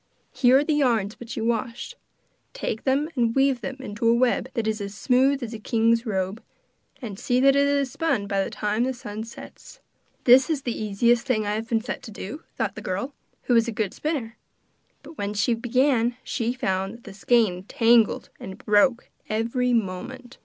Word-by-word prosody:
Here 255 0 +4
are 280 - +3
the 305 - 0
yarns 235 -8 +1
which 235 -1 -8
you 225 - -2
washed. 235 - -2 0.6
Take 225 - -4
them 275 +3 +2
and 235 -3 +1
weave 270 -2 +2
them 270 - -4
into 230 -3 -3
a 230 - +5
web 250 +1 +1
that 230 -3 -1
is 215 -1 -1
as 200 0 -6
smooth 265 +4 +2
as 235 -1 -5
a 225 - -6
king's 230 +2 +1
robe, 190 +1 -2 0.6
and 205 -4 -6
see 245 0 +1
that 275 +1 +5
it 280 0 +4
is 280 -2 +1
spun 280 -11 0
by 200 -1 0
the - - -4
time 210 +1 -1
that 260 - -1
the - - -14
sun 215 -2 -6
sets.' 230 - -12 0.4
'This 255 +3 +6
is 305 -4 0
the 240 - -2
easiest 235 +4 +1
thing 215 -5 +1
I 205 - -1
have 220 +2 -4
been 225 -1 +1
set 245 - -5
to - - -10
do,' 215 +7 -7 0.2
thought - - -1
the - - -8
girl, 200 +10 -3 0.3
who 245 - +1
was 230 0 +4
a - - -1
good 215 -3 -2
spinner. 270 -8 -3 0.7
But 310 +2 -13
when 205 +1 -3
she 235 +4 +2
began 245 0 +1
she 235 -2 -2
found 195 -5 -2
that 235 - -16
the 200 - -10
skein 205 -3 +1
tangled 230 0 +3
and 190 0 -8
broke 215 +4 +2 0.2
every 235 +3 0
moment. 240 +4 -3
235 Hz, 205 wpm, -24 LUFS, 215-260 Hz, 0.7 s, This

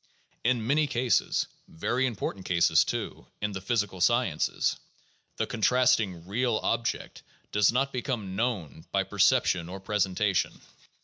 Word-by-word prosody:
In 120 -2 +1
many 150 +5 +2
cases 120 -5 +1
— - - -37
very 125 +10 -1
important 100 -4 -4
cases, 85 -2 +4
too, - - -5
in 105 0 -2
the 95 -1 -5
physical 100 -3 -1
sciences 120 -8 +1 0.3
— - - -39
the - - 0
contrasting 110 -7 +2
"real 115 +4 0
object" 115 +1 -2 0.3
does 105 0 +4
not 135 +3 0
become 120 -7 -3
"known" 100 - -2
by - - +2
perception 85 -2 +2
or 95 +2 -6
presentation. 100 -1 0
105 Hz, 135 wpm, -28 LUFS, 95-125 Hz, 0.3 s, cases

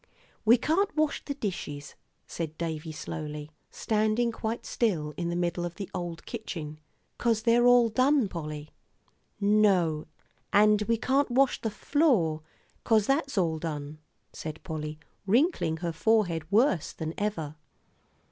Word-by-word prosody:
"We 230 +3 +7
can't 365 - +1
wash 305 -1 +1
the 280 - -4
dishes," 150 - -5 0.3
said 160 -2 -5
Davie, 160 -1 -4
slowly, 150 0 -6 0.2
standing 220 +2 +1
quite 225 +1 -4
still 160 -10 0
in 170 +1 -2
the 175 - -2
middle 175 0 -1
of 175 -1 -4
the 200 -3 -7
old 175 -1 -5
kitchen, 160 -10 -6 0.4
"'cause 225 -2 +1
they're 240 +1 +4
all 245 -1 +6
done, 255 +2 +3
Polly." 155 -4 -6 0.7
"No, 195 -7 +3 0.4
and 210 0 +5
we 230 0 +2
can't 270 +4 +1
wash 260 +2 +2
the 225 - -1
floor, 210 - +1 0.4
'cause 220 -3 +3
that's 275 -2 0
all 165 -4 +1
done," 150 -2 -5 0.3
said 155 0 -7
Polly, 155 -3 -5 0.3
wrinkling 235 - +2
her 170 - 0
forehead 175 -4 +1
worse 210 - +2
than 160 0 -4
ever. 165 -8 -2
195 Hz, 140 wpm, -28 LUFS, 160-230 Hz, 0.7 s, We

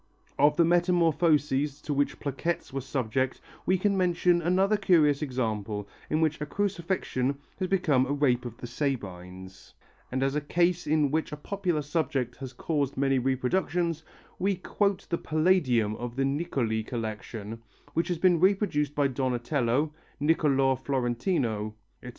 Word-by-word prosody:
Of 145 +1 +5
the 170 - +5
metamorphoses 160 -5 +2
to 150 - -2
which 145 0 0
plaquettes 145 +2 -3
were 135 - -2
subject 130 0 -1 0.3
we 185 - +4
can 200 +2 +1
mention 175 -1 +2
another 190 +5 +3
curious 160 -8 +3
example 110 -7 -2 0.2
in 155 - +1
which 155 -2 +1
a - - -1
Crucifixion 170 -9 -1 0.2
has 185 - 0
become 155 -9 +2
a - - -2
Rape 140 -4 +2
of 120 -2 -7
the 125 - -8
Sabines, 95 -8 -5 0.4
and 130 +1 0
as 135 0 +1
a 150 - 0
case 175 +3 +1
in 150 -2 +2
which 160 +1 -1
a 150 - -5
popular 175 -2 -2
subject 140 -5 -1
has 135 -2 -7
caused 140 +1 -2
many 135 -1 +2
reproductions, 160 +6 0 0.4
we 195 +2 +1
quote 195 +1 -1
the 170 - 0
Palladium 155 - +2
of 120 0 -6
the 135 0 +1
Niccoli 135 -6 -1
collection 110 -1 -5 0.3
which 165 - 0
has 175 - -1
been 175 0 +4
reproduced 180 -6 +2
by 145 - +2
Donatello, 130 +2 0 0.3
Nicolo 140 -3 +3
Florentino, 120 - -1 0.3
etc. 125 - -8
145 Hz, 150 wpm, -28 LUFS, 125-170 Hz, 0.4 s, Of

